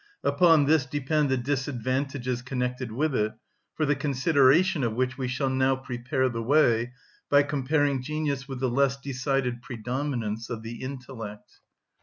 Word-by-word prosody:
Upon 165 Hz, -5 st, +5 dB
this 150 Hz, -2 st, +3 dB
depend 145 Hz, +1 st, 0 dB
the 130 Hz, -, +2 dB
disadvantages 130 Hz, -1 st, -2 dB
connected 125 Hz, -1 st, -3 dB
with 145 Hz, +6 st, 0 dB
it, 110 Hz, -3 st, 0 dB, 0.4 s
for 155 Hz, -, +1 dB
the 145 Hz, 0 st, +2 dB
consideration 140 Hz, +4 st, +3 dB
of 115 Hz, -2 st, -1 dB
which 130 Hz, +1 st, 0 dB
we 130 Hz, -1 st, -3 dB
shall 130 Hz, +2 st, -1 dB
now 130 Hz, 0 st, +2 dB
prepare 130 Hz, +1 st, -2 dB
the 115 Hz, -2 st, -3 dB
way 120 Hz, -2 st, +3 dB, 0.4 s
by 145 Hz, 0 st, +6 dB
comparing 145 Hz, -1 st, 0 dB
genius 145 Hz, -1 st, -2 dB
with 135 Hz, -2 st, -6 dB
the 130 Hz, -, +2 dB
less 135 Hz, +1 st, +2 dB
decided 135 Hz, -2 st, -2 dB
predominance 120 Hz, -2 st, -3 dB
of 115 Hz, -2 st, -5 dB
the 115 Hz, +1 st, -7 dB
intellect. 125 Hz, -5 st, -8 dB
130 Hz, 150 wpm, -27 LUFS, 125-145 Hz, 0.4 s, by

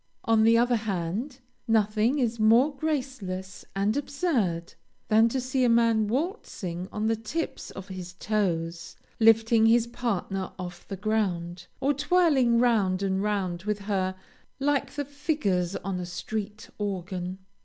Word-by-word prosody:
On 225 Hz, -2 st, +4 dB
the 225 Hz, +1 st, +6 dB
other 240 Hz, 0 st, +3 dB
hand, 215 Hz, -, -3 dB, 0.3 s
nothing 220 Hz, +3 st, +2 dB
is 235 Hz, -4 st, 0 dB
more 235 Hz, +7 st, +5 dB
graceless 255 Hz, -11 st, -4 dB
and 200 Hz, +2 st, +1 dB
absurd, 255 Hz, -, -1 dB, 0.4 s
than 220 Hz, +1 st, +5 dB
to 260 Hz, -, -1 dB
see 255 Hz, +1 st, 0 dB
a 245 Hz, -, +4 dB
man 230 Hz, -2 st, +3 dB
waltzing 220 Hz, -, -3 dB
on 210 Hz, +1 st, -2 dB
the 225 Hz, +1 st, +2 dB
tips 235 Hz, +10 st, -4 dB
of 195 Hz, +1 st, -9 dB
his 180 Hz, -1 st, -7 dB
toes, 170 Hz, -5 st, -2 dB, 0.2 s
lifting 225 Hz, 0 st, +5 dB
his 230 Hz, 0 st, +5 dB
partner 195 Hz, -5 st, -3 dB
off 175 Hz, -1 st, -8 dB
the 195 Hz, -, -5 dB
ground, 180 Hz, -5 st, -1 dB
or 275 Hz, +2 st, +2 dB
twirling 285 Hz, -5 st, +3 dB
round 205 Hz, -6 st, +2 dB
and 190 Hz, 0 st, 0 dB
round 195 Hz, -4 st, -1 dB
with 210 Hz, -1 st, 0 dB
her 190 Hz, -2 st, -1 dB, 0.4 s
like 285 Hz, 0 st, +1 dB
the 290 Hz, 0 st, -4 dB
figures 260 Hz, -, -1 dB
on 190 Hz, -2 st, -3 dB
a 180 Hz, -, -4 dB
street 210 Hz, +3 st, -5 dB
organ. 185 Hz, -2 st, -3 dB
215 Hz, 145 wpm, -27 LUFS, 185-245 Hz, 0.4 s, the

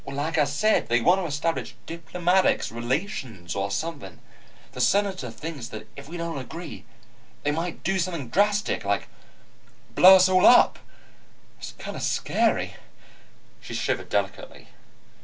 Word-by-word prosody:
Like 150 Hz, +4 st, -2 dB
I 150 Hz, -, +4 dB
say, 145 Hz, +11 st, +2 dB
they 120 Hz, +1 st, 0 dB
want 180 Hz, +10 st, +3 dB
to 175 Hz, -, -3 dB
establish 150 Hz, +3 st, -2 dB
diplomatic 175 Hz, -, 0 dB
relations 120 Hz, -, -4 dB
or 100 Hz, 0 st, -2 dB
something. 155 Hz, +8 st, -5 dB, 0.5 s
The -, -, -5 dB
Senator 195 Hz, -9 st, +1 dB
thinks 135 Hz, +2 st, -7 dB
that 110 Hz, 0 st, -9 dB
if 140 Hz, +1 st, -11 dB
we 175 Hz, -, -6 dB
don't 170 Hz, -3 st, -4 dB
agree, 140 Hz, -, -9 dB, 0.6 s
they 145 Hz, -, +1 dB
might 165 Hz, +3 st, -4 dB
do 190 Hz, +2 st, 0 dB
something 170 Hz, -8 st, -3 dB
drastic, 205 Hz, -, +1 dB
like -, -, -1 dB, 0.9 s
blow 190 Hz, +1 st, +9 dB
us 185 Hz, 0 st, +6 dB
all 185 Hz, 0 st, +5 dB
up. 245 Hz, -, +6 dB, 0.8 s
It's -, -, -8 dB
kind -, -, -8 dB
of -, -, -6 dB
scary." -, -, 0 dB, 0.8 s
She -, -, -8 dB
shivered -, -, -2 dB
delicately. -, -, -3 dB
165 Hz, 140 wpm, -25 LUFS, 135-185 Hz, 0.9 s, blow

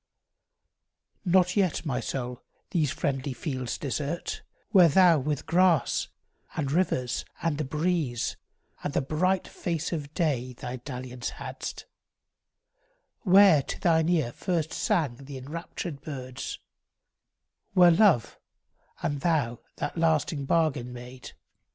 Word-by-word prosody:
XXIV -, -, +1 dB
NOT 180 Hz, 0 st, +4 dB
yet, 185 Hz, -5 st, +1 dB
my 135 Hz, -5 st, -1 dB
soul, 125 Hz, -2 st, -4 dB, 0.3 s
these 160 Hz, -6 st, +2 dB
friendly 135 Hz, -2 st, -2 dB
fields 130 Hz, -2 st, -3 dB
desert, 150 Hz, +4 st, -3 dB, 0.3 s
Where 185 Hz, -5 st, +8 dB
thou 175 Hz, 0 st, +6 dB
with 145 Hz, +1 st, -2 dB
grass, 170 Hz, -6 st, +3 dB, 0.5 s
and 140 Hz, -4 st, -1 dB
rivers, 135 Hz, -7 st, 0 dB, 0.2 s
and 160 Hz, -3 st, 0 dB
the -, -, +1 dB
breeze, 150 Hz, -4 st, -1 dB, 0.5 s
And 145 Hz, -, -2 dB
the -, -, +3 dB
bright 185 Hz, +7 st, +1 dB
face 170 Hz, -1 st, -3 dB
of 145 Hz, -3 st, -4 dB
day, 130 Hz, -7 st, 0 dB
thy 125 Hz, +1 st, -6 dB
dalliance 125 Hz, -1 st, -6 dB
hadst; -, -, -6 dB, 1.3 s
Where 190 Hz, -, +6 dB
to -, -, -6 dB
thine 160 Hz, -1 st, +3 dB
ear 155 Hz, -9 st, +2 dB
first 165 Hz, +2 st, -2 dB
sang 145 Hz, -9 st, 0 dB
the 135 Hz, 0 st, -9 dB
enraptured 150 Hz, +1 st, -6 dB
birds; 130 Hz, -4 st, -6 dB, 1.2 s
Where 180 Hz, -2 st, +7 dB
love 170 Hz, -, +3 dB, 0.6 s
and 145 Hz, -2 st, -1 dB
thou 140 Hz, -9 st, +1 dB, 0.2 s
that -, -, -3 dB
lasting 155 Hz, -3 st, +1 dB
bargain 145 Hz, -6 st, +1 dB
made. 125 Hz, +1 st, -10 dB
150 Hz, 120 wpm, -27 LUFS, 130-170 Hz, 1.3 s, Where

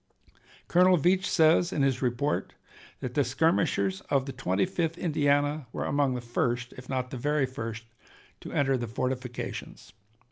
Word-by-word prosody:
Colonel 180 Hz, +1 st, +5 dB
Veatch 185 Hz, +5 st, +2 dB
says 165 Hz, 0 st, +4 dB
in 145 Hz, -, 0 dB
his 135 Hz, -2 st, +1 dB
report 125 Hz, +3 st, -1 dB, 0.5 s
that 125 Hz, -, -4 dB
the 145 Hz, -, +3 dB
skirmishers 125 Hz, -, +1 dB
of 135 Hz, -2 st, +2 dB
the 135 Hz, -, -5 dB
Twenty 95 Hz, -6 st, 0 dB
fifth 170 Hz, -3 st, -2 dB
Indiana 145 Hz, -3 st, +1 dB
were -, -, -3 dB
among 140 Hz, -2 st, +1 dB
the 125 Hz, -, -3 dB
first, 120 Hz, 0 st, -1 dB
if 125 Hz, 0 st, -12 dB
not 130 Hz, -1 st, -2 dB
the 130 Hz, -, -4 dB
very 145 Hz, +2 st, +1 dB
first, 115 Hz, -3 st, -6 dB, 0.6 s
to -, -, -9 dB
enter 135 Hz, -2 st, +2 dB
the 120 Hz, -1 st, -4 dB
fortifications. 125 Hz, -5 st, -5 dB
135 Hz, 155 wpm, -28 LUFS, 125-155 Hz, 0.6 s, Colonel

